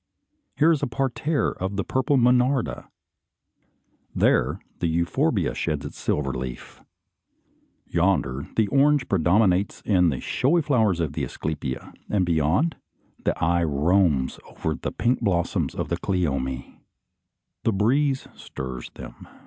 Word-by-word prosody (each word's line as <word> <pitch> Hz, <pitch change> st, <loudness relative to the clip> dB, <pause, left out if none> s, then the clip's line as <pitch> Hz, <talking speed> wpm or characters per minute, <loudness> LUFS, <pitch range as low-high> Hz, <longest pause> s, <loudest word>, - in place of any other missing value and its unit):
Here 160 Hz, +2 st, +4 dB
is 155 Hz, -, +1 dB
a 145 Hz, -, 0 dB
parterre 135 Hz, +4 st, 0 dB
of 95 Hz, +2 st, -4 dB
the 100 Hz, -, -1 dB
purple 130 Hz, +5 st, +1 dB
monarda, 125 Hz, +1 st, +2 dB, 1.3 s
there -, -, +2 dB, 0.2 s
the 85 Hz, -, 0 dB
euphorbia 85 Hz, +1 st, +1 dB
sheds 75 Hz, -4 st, -2 dB
its -, -, -8 dB
silver 70 Hz, -3 st, -1 dB
leaf. 65 Hz, -1 st, -7 dB, 1.0 s
Yonder 85 Hz, -7 st, 0 dB
the 110 Hz, -2 st, +3 dB
orange 140 Hz, +1 st, +3 dB
predominates 95 Hz, +2 st, +2 dB
in 90 Hz, -4 st, +3 dB
the 65 Hz, -5 st, -2 dB
showy 165 Hz, +5 st, +1 dB
flowers 110 Hz, -, +2 dB
of 80 Hz, -4 st, -1 dB
the 75 Hz, -, -3 dB
asclepia; 70 Hz, 0 st, -4 dB, 0.2 s
and 95 Hz, -3 st, +2 dB
beyond, 85 Hz, -, +1 dB, 0.5 s
the -, -, +1 dB
eye 85 Hz, +1 st, +2 dB
roams 75 Hz, -2 st, +2 dB
over 80 Hz, -, -3 dB
the -, -, -4 dB
pink 120 Hz, +2 st, +1 dB
blossoms 90 Hz, -6 st, 0 dB
of -, -, -3 dB
the -, -, 0 dB
cleome. 70 Hz, -8 st, -2 dB, 0.8 s
The 115 Hz, -, +2 dB
breeze 130 Hz, +7 st, +1 dB
stirs 65 Hz, -2 st, -7 dB
them. -, -, -11 dB
90 Hz, 130 wpm, -24 LUFS, 75-125 Hz, 1.3 s, Here